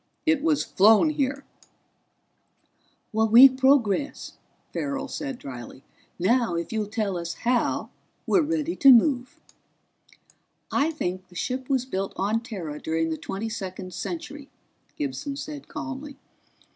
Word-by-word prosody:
It 315 -3 +3
was 305 -2 +2
flown 220 - +5
here." 275 -1 -2 1.7
"We 225 +4 +8
progress," 265 -2 +1 0.4
Farrell 280 -1 -3
said 275 -3 -5
dryly. 130 - -9 0.3
"Now 220 +1 +2
if 170 +5 -4
you'll 215 -2 -1
tell 210 -3 -2
us 170 0 -5
how, 245 0 0 0.3
we're 370 - +3
ready 320 +1 -1
to 275 - +7
move." 250 0 +3 1.3
"I 290 +3 +2
think 185 - -4
the 180 - -18
ship 255 - -3
was 260 -2 +1
built 195 -6 -3
on 210 +4 0
Terra 175 -11 -6
during 160 0 -1
the - - -1
Twenty 190 +8 -5
second 190 -4 -6
Century," 295 -4 -6 0.5
Gibson 285 -1 -4
said 290 0 -7
calmly. 290 -1 -7
250 Hz, 125 wpm, -25 LUFS, 195-285 Hz, 1.7 s, We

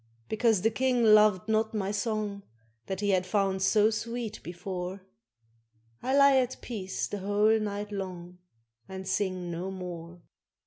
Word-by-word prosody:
Because 220 -3 +2
the 225 - +3
King 250 +1 +1
loved 215 -2 +5
not 220 0 +1
my 200 -2 -1
song 210 -1 -2 0.5
That 190 0 -3
he 205 -1 +2
had 185 -1 +2
found 195 -1 0
so 215 +3 +4
sweet 230 0 -4
before, 180 +2 -6 1.0
I 265 +2 +1
lie 280 -1 +7
at 255 -1 0
peace 195 -6 -4
the 205 - -5
whole 205 +3 +3
night 205 0 -4
long, 180 -3 -6 0.5
And 190 0 -7
sing 185 -3 -1
no 175 +3 -4
more. 175 -2 -8
205 Hz, 145 wpm, -29 LUFS, 185-220 Hz, 1.0 s, lie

